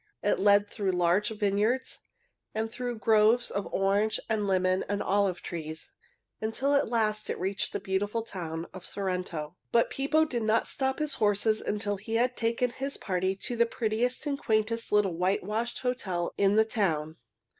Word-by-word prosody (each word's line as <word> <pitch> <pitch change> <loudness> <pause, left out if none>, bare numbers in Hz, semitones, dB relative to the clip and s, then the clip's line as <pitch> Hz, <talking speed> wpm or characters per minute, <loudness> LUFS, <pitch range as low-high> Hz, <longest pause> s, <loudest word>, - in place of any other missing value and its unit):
It - - +2
led 205 +1 +5
through 195 -3 -2
large 180 +4 +2
vineyards 215 +4 0 0.6
and 220 +1 -1
through 245 -1 -4
groves 220 +2 +4
of 200 - -3
orange 200 +3 +1
and 215 -2 0
lemon 185 -1 +2
and 205 0 -1
olive 195 -2 +1
trees, 160 -2 -5 0.5
until 240 +6 0
at 280 - +3
last 215 -2 0
it - - -2
reached 190 +2 -1
the - - -2
beautiful 205 +4 -1
town 165 -6 -5
of 185 -1 -9
Sorrento. 180 -5 -4
But 235 0 +3
Pippo 305 +4 +2
did 245 -6 -2
not 220 +1 +2
stop 265 -1 -1
his 305 -2 -1
horses 215 +1 +3
until 205 -1 -2
he 220 +3 -4
had 250 +2 +2
taken 230 +2 0
his 275 +3 -4
party 185 -1 -1
to 245 - -1
the 235 0 +3
prettiest 230 +4 -1
and 280 -1 -1
quaintest 220 0 0
little 210 -3 +3
whitewashed 205 +6 -1
hotel 190 -9 -2
in 200 0 +3
the 220 0 +5
town. 160 -9 -1
210 Hz, 165 wpm, -29 LUFS, 190-230 Hz, 0.6 s, led